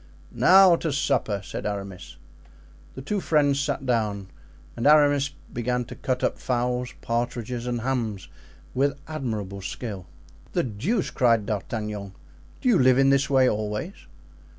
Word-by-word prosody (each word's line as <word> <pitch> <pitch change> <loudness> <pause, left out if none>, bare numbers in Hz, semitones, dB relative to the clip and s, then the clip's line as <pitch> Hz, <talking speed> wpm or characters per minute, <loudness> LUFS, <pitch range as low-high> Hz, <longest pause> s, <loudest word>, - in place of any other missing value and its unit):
"Now 190 -2 +7
to 160 - -2
supper," 135 -7 0
said - - -5
Aramis. 95 -6 -6 0.8
The 130 - -7
two 200 +7 -2
friends 145 -4 +2
sat 140 -1 -2
down 105 -6 -1 0.5
and 120 +3 0
Aramis 145 -2 +5 0.2
began 125 +1 -1
to - - -9
cut 130 -1 -2
up - - 0
fowls, 125 0 -1
partridges 120 +1 -3
and 120 -1 -2
hams 115 -6 -2 0.5
with 140 +2 0
admirable 110 -10 -4
skill. 95 -3 -6 0.5
"The - - +1
deuce!" 140 - -2
cried 115 -4 +2
D'Artagnan; 105 -1 -4 0.5
"do 255 - +2
you 220 - +4
live 130 0 +5
in 135 0 +5
this 140 +1 +2
way 130 -2 +4
always?" 105 - -2
125 Hz, 140 wpm, -25 LUFS, 105-140 Hz, 0.8 s, Now